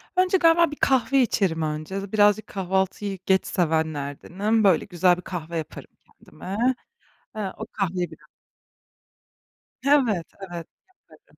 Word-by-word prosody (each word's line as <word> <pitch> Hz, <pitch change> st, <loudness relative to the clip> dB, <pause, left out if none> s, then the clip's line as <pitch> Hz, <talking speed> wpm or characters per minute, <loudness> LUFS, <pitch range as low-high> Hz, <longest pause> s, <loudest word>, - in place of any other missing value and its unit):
Önce 370 Hz, +1 st, +3 dB
galiba 330 Hz, -2 st, +4 dB
bir -, -, -5 dB
kahve 270 Hz, -1 st, +2 dB
içerim 190 Hz, -9 st, +1 dB
önce. 155 Hz, +6 st, -4 dB
Birazcık 210 Hz, 0 st, +3 dB
kahvaltıyı 190 Hz, +1 st, -2 dB
geç 190 Hz, 0 st, +3 dB
sevenlerdenim. 160 Hz, +6 st, -1 dB
Böyle, 185 Hz, -6 st, +4 dB
güzel 180 Hz, -1 st, +2 dB
bir 180 Hz, -, -7 dB
kahve 170 Hz, -3 st, -5 dB
yaparım 160 Hz, -, -7 dB, 0.2 s
kendime. 190 Hz, +2 st, -9 dB, 0.8 s
Eee, 200 Hz, -3 st, -3 dB
o -, -, -5 dB
kahveyi 180 Hz, -3 st, -2 dB
biraz -, -, -16 dB, 1.6 s
Evet, 235 Hz, -, +3 dB
evet, 175 Hz, -3 st, -7 dB, 0.4 s
yaparım. -, -, -22 dB
190 Hz, 120 wpm, -24 LUFS, 170-215 Hz, 1.6 s, galiba